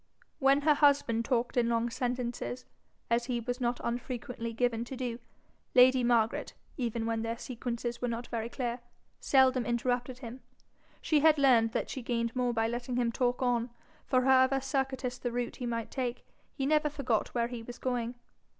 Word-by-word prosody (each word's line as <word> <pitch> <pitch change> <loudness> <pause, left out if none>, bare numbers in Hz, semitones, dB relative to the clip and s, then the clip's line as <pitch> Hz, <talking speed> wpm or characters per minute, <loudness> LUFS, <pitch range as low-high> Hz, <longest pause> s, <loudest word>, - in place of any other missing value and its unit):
When 275 0 +4
her 300 +1 +5
husband 280 -6 +3
talked 245 0 0
in 235 -1 +3
long 235 0 0
sentences, 245 0 -3 0.5
as 235 0 +2
he 245 -1 -1
was 245 +2 -4
not 240 0 0
unfrequently 240 -1 -4
given 230 0 0
to 260 +2 -7
do, 245 -2 -3 0.6
lady 255 0 +6
Margaret, 235 -2 +1 0.2
even 235 -3 -2
when 225 0 -1
their 230 +1 -3
sequences 240 -1 -4
were 245 - 0
not 235 +1 -3
very 230 -1 -4
clear, 240 -1 -3 0.4
seldom 260 -2 +4
interrupted 245 +2 -1
him: 250 0 -9 0.6
she 310 -2 +3
had 310 +1 +5
learned 240 -5 +4
that - - -2
she 260 - -4
gained 235 -1 -2
more 250 -1 +1
by 225 -1 +1
letting 240 +1 -3
him 240 -1 +1
talk 245 +1 0
on; 245 -1 +1 0.4
for 255 -1 +3
however 260 +1 +5
circuitous 265 -2 -2
the 245 - -2
route 240 0 -3
he 245 - -4
might 230 -1 -3
take, 250 -2 -3 0.3
he 270 - -2
never 300 +1 +3
forgot 255 -8 -1
where 235 -1 +1
he 240 -2 -6
was 240 +1 -9
going. 245 -1 -2
245 Hz, 175 wpm, -30 LUFS, 235-260 Hz, 0.6 s, lady